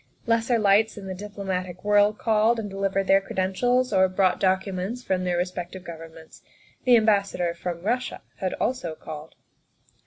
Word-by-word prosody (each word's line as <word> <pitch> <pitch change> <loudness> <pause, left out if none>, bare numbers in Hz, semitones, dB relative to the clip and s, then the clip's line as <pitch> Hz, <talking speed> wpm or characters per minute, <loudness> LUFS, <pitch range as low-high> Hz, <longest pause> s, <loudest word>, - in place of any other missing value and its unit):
Lesser 230 0 +2
lights 215 +1 +3
in 200 - -8
the 190 - -4
diplomatic 185 -2 -5
world 205 +1 +4
called 225 +1 +2
and 215 - -4
delivered 195 0 -1
their 195 +1 +5
credentials 245 +7 0
or 190 0 +4
brought 185 0 +2
docu 190 +1 +1
ments 200 +7 -4
from 185 -1 -1
their 175 -1 0
respective 180 +1 -4
Governments. 165 -1 -11 0.4
The 250 -1 +7
Am 220 -2 +4
bassador 200 -5 +1
from 170 0 -5
Russia 245 +5 -2
had 185 -2 -2
also 205 -11 -2
called. 155 0 -9
195 Hz, 160 wpm, -25 LUFS, 180-215 Hz, 0.4 s, The